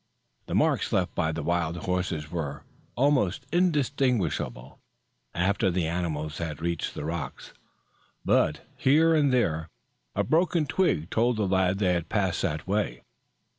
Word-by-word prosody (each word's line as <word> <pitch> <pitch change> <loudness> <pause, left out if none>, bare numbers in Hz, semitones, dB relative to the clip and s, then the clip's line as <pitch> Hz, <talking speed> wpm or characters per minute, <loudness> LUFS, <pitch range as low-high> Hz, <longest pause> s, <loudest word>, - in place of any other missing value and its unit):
The - - -2
marks - - +2
left - - +1
by 80 - 0
the 80 -1 -4
wild 85 0 0
horses 85 -4 -2
were 75 -5 -4 0.3
almost 130 -6 +2
indistinguishable 130 - 0 0.6
after 95 +3 +2
the 90 -1 0
animals 80 -3 -3
had 80 -3 -4
reached 85 0 -2
the - - -5
rocks, 80 -4 -5 0.7
but - - +2
here 160 +5 +4
and 145 -3 +3
there 80 -10 +1 0.5
a - - +2
broken 170 0 +2
twig 135 - 0
told 120 +1 +2
the 105 - +1
lad 95 0 +2
they 95 -3 +2
had 85 -2 -2
passed 95 -5 0
that 75 -5 -2
way. 95 - -1
90 Hz, 140 wpm, -27 LUFS, 80-125 Hz, 0.7 s, here